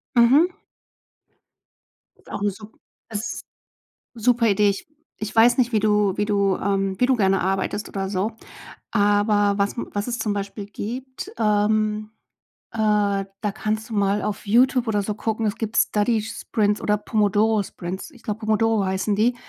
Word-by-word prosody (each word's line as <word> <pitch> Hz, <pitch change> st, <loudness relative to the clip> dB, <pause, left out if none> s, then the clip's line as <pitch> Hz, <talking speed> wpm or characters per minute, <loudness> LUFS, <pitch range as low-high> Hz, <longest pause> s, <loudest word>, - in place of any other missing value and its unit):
Mhm. 265 Hz, +9 st, +6 dB, 1.8 s
Auch -, -, -6 dB
'ne 205 Hz, -, +1 dB
sup 210 Hz, +3 st, -13 dB, 0.3 s
es 220 Hz, +1 st, -4 dB, 0.7 s
super 235 Hz, 0 st, +2 dB
Idee. 205 Hz, 0 st, +3 dB
Ich 200 Hz, -, -5 dB, 0.3 s
ich 215 Hz, 0 st, -5 dB
weiß 230 Hz, +4 st, +6 dB
nicht, 250 Hz, -1 st, +2 dB
wie 215 Hz, -, +3 dB
du 210 Hz, -2 st, +2 dB
wie 210 Hz, -, +1 dB
du 200 Hz, -2 st, +1 dB
ähm, 195 Hz, -1 st, -1 dB
wie 250 Hz, -, +5 dB
du 265 Hz, -, +3 dB
gerne 195 Hz, -2 st, +2 dB
arbeitest 190 Hz, +2 st, -1 dB
oder 195 Hz, -1 st, -3 dB
so. 200 Hz, +3 st, -1 dB, 0.6 s
Aber 205 Hz, -1 st, +2 dB
was 200 Hz, 0 st, +1 dB
m 235 Hz, -, -4 dB
was 205 Hz, +2 st, -2 dB
es 240 Hz, 0 st, -2 dB
zum 210 Hz, -, -1 dB
Beispiel 200 Hz, 0 st, -5 dB
gibt, 250 Hz, +6 st, -6 dB
ähm, 215 Hz, 0 st, +1 dB, 0.6 s
äh, 225 Hz, -, -9 dB
da 205 Hz, -1 st, 0 dB
kannst 215 Hz, +1 st, -3 dB
du 225 Hz, -, -6 dB
mal 200 Hz, 0 st, +1 dB
auf 210 Hz, 0 st, -4 dB
Youtube 250 Hz, +3 st, +3 dB
oder 210 Hz, -2 st, +1 dB
so 210 Hz, +1 st, -3 dB
gucken, 220 Hz, +1 st, -2 dB
es 205 Hz, -, -2 dB
gibt 225 Hz, -1 st, -3 dB
„Study 215 Hz, +1 st, +2 dB
Sprints“ 210 Hz, -1 st, -1 dB
oder 210 Hz, 0 st, +1 dB
„Pomodoro 210 Hz, +1 st, +2 dB
Sprints“. 185 Hz, -, -7 dB
Ich 245 Hz, -5 st, -19 dB
glaube, 210 Hz, 0 st, -3 dB
„Pomodoro“ 220 Hz, -1 st, +2 dB
heißen 190 Hz, +2 st, 0 dB
die. 235 Hz, +4 st, +2 dB
210 Hz, 165 wpm, -23 LUFS, 200-225 Hz, 1.8 s, Mhm